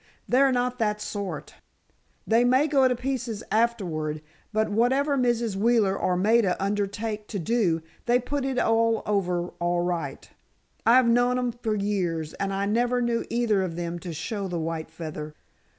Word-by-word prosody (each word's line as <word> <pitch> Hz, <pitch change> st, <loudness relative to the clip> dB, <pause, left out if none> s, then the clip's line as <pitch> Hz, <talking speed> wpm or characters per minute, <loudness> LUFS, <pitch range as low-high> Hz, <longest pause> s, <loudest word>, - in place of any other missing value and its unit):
They're 265 Hz, +2 st, +4 dB
not 250 Hz, 0 st, 0 dB
that 210 Hz, -2 st, 0 dB
sort. 200 Hz, -2 st, -5 dB, 0.7 s
They 230 Hz, +2 st, +4 dB
may 255 Hz, +4 st, +4 dB
go 275 Hz, -4 st, +4 dB
to 250 Hz, -, +1 dB
pieces 245 Hz, -3 st, -3 dB
afterward, 170 Hz, -10 st, 0 dB, 0.3 s
but 220 Hz, 0 st, +1 dB
whatever 265 Hz, +6 st, +2 dB
Mrs. 240 Hz, -5 st, +1 dB
Wheeler 210 Hz, -2 st, +3 dB
or 180 Hz, -2 st, 0 dB
Maida 210 Hz, -1 st, +3 dB
undertake 205 Hz, +2 st, -2 dB
to 210 Hz, -, -4 dB
do, 180 Hz, -4 st, +1 dB, 0.2 s
they 240 Hz, +1 st, +5 dB
put 275 Hz, +3 st, -3 dB
it 265 Hz, -1 st, -2 dB
over 210 Hz, -7 st, +1 dB
all 175 Hz, 0 st, +1 dB
right. 175 Hz, -1 st, -3 dB, 0.6 s
I've 245 Hz, +1 st, +6 dB
known 245 Hz, +1 st, +3 dB
'em 250 Hz, -1 st, 0 dB
for 230 Hz, -2 st, -2 dB
years, 180 Hz, -6 st, -1 dB
and 195 Hz, 0 st, -3 dB
I 195 Hz, +1 st, -1 dB
never 240 Hz, +4 st, +1 dB
knew 235 Hz, -1 st, 0 dB
either 230 Hz, -4 st, +1 dB
of 180 Hz, -3 st, -3 dB
them 170 Hz, 0 st, -4 dB
to 175 Hz, 0 st, -6 dB
show 195 Hz, +5 st, -4 dB
the 175 Hz, -2 st, -3 dB
white 160 Hz, 0 st, -3 dB
feather." 155 Hz, -2 st, -7 dB
215 Hz, 160 wpm, -26 LUFS, 180-240 Hz, 0.7 s, I've